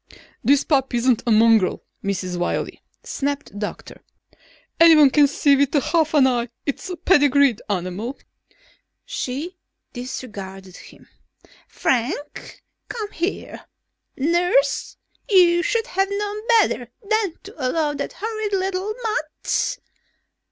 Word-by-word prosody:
"This 280 +1 +4
pup 270 -4 +1
isn't 240 -1 +2
a - - +3
mongrel, 220 -3 +4 0.2
Mrs. 185 -2 -2
Wiley," 175 0 -3 0.2
snapped 285 +1 -3
the 205 - -9
doctor. 210 - -7 0.8
"Anyone 315 -4 +7
can 290 0 +5
see 285 0 +3
with 280 +1 +1
half 315 +2 +1
an 280 -3 +6
eye 245 -2 0 0.2
it's 280 +5 -4
a 360 - -5
pedigreed 285 - +3
animal." 200 +7 -3 0.9
She 345 - -5 0.3
disregarded 195 -7 -8
him. - - -15 0.6
"Frank! 260 +4 -3 0.3
Come 425 -3 -5
here! 345 +4 -4 0.5
Nurse, 315 -2 +1 0.3
you 350 -4 +5
should 455 +5 0
have 390 -3 0
known 415 +2 -4
better 420 - +2 0.2
than 435 -5 0
to 405 +2 -11
allow 295 +3 0
that - - -5
horrid 435 -1 -4
little 385 +2 -1
mutt...." 430 +4 -2
290 Hz, 115 wpm, -22 LUFS, 245-370 Hz, 0.9 s, Anyone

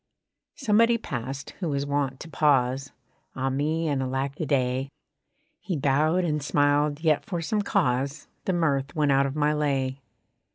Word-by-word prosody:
Somebody 230 -1 +3
passed, 135 - -5
who 175 -4 -2
was 140 -1 -1
wont 140 -2 -1
to - - -8
pause: 135 -3 +1 0.4
(Ah 135 0 -1
me, 155 +4 0
and 140 -3 0
alack 135 +2 -2
a 160 - -2
day.) 130 0 0 0.7
He 180 - -3
bowed 150 +6 +2
and 150 -3 0
smiled; 145 +1 +2
yet 155 -3 +2
for 175 - -3
some 205 +6 0
cause 135 -5 0 0.2
The 190 - +1
mirth 140 -4 0
went 150 -2 +2
out 140 0 +3
of 135 - -5
my 150 0 +2
lay. 135 -3 -1
145 Hz, 160 wpm, -26 LUFS, 135-155 Hz, 0.7 s, Somebody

